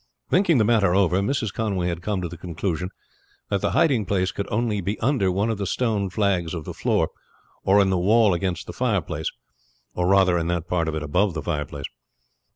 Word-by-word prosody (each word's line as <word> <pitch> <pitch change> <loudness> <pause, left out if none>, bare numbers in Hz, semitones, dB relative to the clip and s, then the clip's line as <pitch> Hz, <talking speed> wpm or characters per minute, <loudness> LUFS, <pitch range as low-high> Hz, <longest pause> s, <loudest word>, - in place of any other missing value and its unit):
Thinking 175 -4 +4
the 110 - +3
matter 105 -5 +3
over, 95 -2 +3
Mrs. 110 0 -1
Conway 100 -5 -1
had 85 -1 -3
come 95 0 -2
to - - -1
the 85 - -8
conclusion 90 +1 -3 0.6
that 100 -2 +1
the - - +1
hiding 125 - +2
place 95 -1 +1
could 100 - -4
only 105 -2 0
be 100 +4 -3
under 120 -7 +1
one 100 +5 0
of 110 - -4
the 100 - -2
stone 105 -3 0
flags 90 -4 0
of 80 -3 -6
the - - -6
floor - - +1 0.5
or 100 +2 +4
in 95 -1 +3
the 95 - +1
wall 105 +2 +4
against 90 0 -2
the - - -8
fireplace, - - -1 0.6
or 90 0 0
rather 95 -2 +4
in 80 - -2
that 85 -1 -2
part 85 -2 0
of 80 - -2
it 80 - -3
above 90 +5 +1
the 75 - -3
fireplace. 75 -4 -3
95 Hz, 210 wpm, -24 LUFS, 85-105 Hz, 0.6 s, Thinking